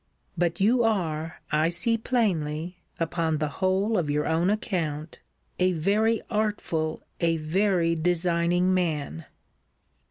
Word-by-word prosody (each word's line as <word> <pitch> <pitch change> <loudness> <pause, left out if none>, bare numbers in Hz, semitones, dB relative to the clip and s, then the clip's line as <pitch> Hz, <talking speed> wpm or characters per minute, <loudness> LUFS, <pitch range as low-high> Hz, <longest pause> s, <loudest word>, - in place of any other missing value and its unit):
But 170 -1 0
you 235 +5 +4
are, 165 -8 -1
I 155 +2 +3
see 175 +7 +1
plainly, 180 -8 -1 0.2
(upon 165 -1 0
the 150 0 -1
whole 190 +3 +2
of 155 -4 -2
your 150 +1 0
own 165 +3 +1
account,) 165 -8 -2 0.4
a 185 0 +3
very 210 +7 +1
artful, 205 -8 -1 0.2
a 165 -1 +2
very 170 +1 +1
designing 175 +2 +2
man. 150 - -1
175 Hz, 120 wpm, -26 LUFS, 160-195 Hz, 0.4 s, you